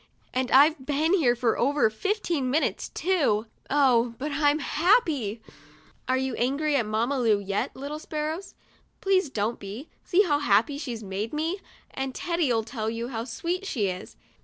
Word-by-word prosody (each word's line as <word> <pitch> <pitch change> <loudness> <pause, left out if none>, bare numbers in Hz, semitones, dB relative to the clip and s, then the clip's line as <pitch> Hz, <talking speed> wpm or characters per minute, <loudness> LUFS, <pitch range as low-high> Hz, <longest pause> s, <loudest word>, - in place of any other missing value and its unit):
And 255 0 0
I've 290 +2 +5
been 300 +5 +1
here 270 -11 +4
for 240 -2 0
over 285 0 +3
fifteen 340 - -1
minutes, 300 +5 0
too. 290 - +1 0.2
Oh, 250 -5 +3
but 295 +3 -4
I'm 290 +1 +3
happy! 295 - +1 0.6
"Are 255 - +2
you 265 0 -1
angry 280 +5 +1
at 235 -6 +1
Mamma 235 +6 0
Lu 225 -4 +3
yet, 200 0 -2
little 285 +3 -5
sparrows? 310 +4 -4 0.4
Please 380 -5 +2
don't 220 -1 -2
be. 205 +9 -8
See 385 +3 +4
how 295 -6 +1
happy 260 +3 +2
she's 240 -7 -5
made 200 +4 -4
me! 325 +6 -1 0.3
And 265 -1 -4
Teddy'll 315 -10 0
tell 220 -1 -3
you 230 +2 -4
how 230 -2 -4
sweet 350 +8 -3
she 210 - 0
is. 180 0 -7
270 Hz, 160 wpm, -26 LUFS, 230-310 Hz, 0.6 s, I've